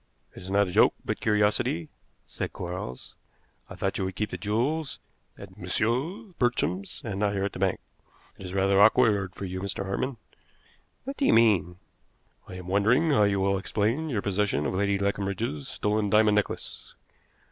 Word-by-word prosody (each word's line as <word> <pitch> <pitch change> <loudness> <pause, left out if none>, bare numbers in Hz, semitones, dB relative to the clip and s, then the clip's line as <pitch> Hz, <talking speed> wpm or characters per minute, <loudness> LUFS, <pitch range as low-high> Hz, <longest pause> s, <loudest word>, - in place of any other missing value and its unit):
"It - - -11
is 95 - -9
not 100 0 +3
a - - -5
joke, - - +5
but - - -2
curiosity," 105 -6 +1 0.4
said - - -5
Quarles. 90 -8 -6 0.6
"I - - -8
thought - - -2
you 95 - 0
would 95 0 -4
keep 105 +2 -2
the - - -4
jewels 130 +9 -1 0.4
at 100 0 -12
Messrs. 130 - -1
Bartrams 100 -6 -1
and 100 -3 -3
not 105 -1 +1
here 95 -1 -1
at 100 - -2
the - - -7
bank. 95 -1 +1 0.6
It 95 - -7
is 90 - -8
rather 95 +1 +3
awkward 100 -3 +4
for 100 - -5
you, 95 0 -4
Mr. 100 0 -3
Hartmann." 120 +7 -2 0.9
"What 275 +2 -6
do 280 - +1
you - - +5
mean?" 100 -6 +4 0.7
"I 95 - -9
am 90 -1 -8
wondering 115 - +3
how 105 -7 +4
you 100 -1 +1
will 100 0 +1
explain 115 +11 -1
your 110 -7 -1
possession 100 -7 0
of - - -1
Lady 100 +1 +1
Leconbridge's 100 -5 -2
stolen 105 0 -1
diamond 105 0 +4
necklace." 105 0 -3
100 Hz, 180 wpm, -27 LUFS, 95-110 Hz, 0.9 s, joke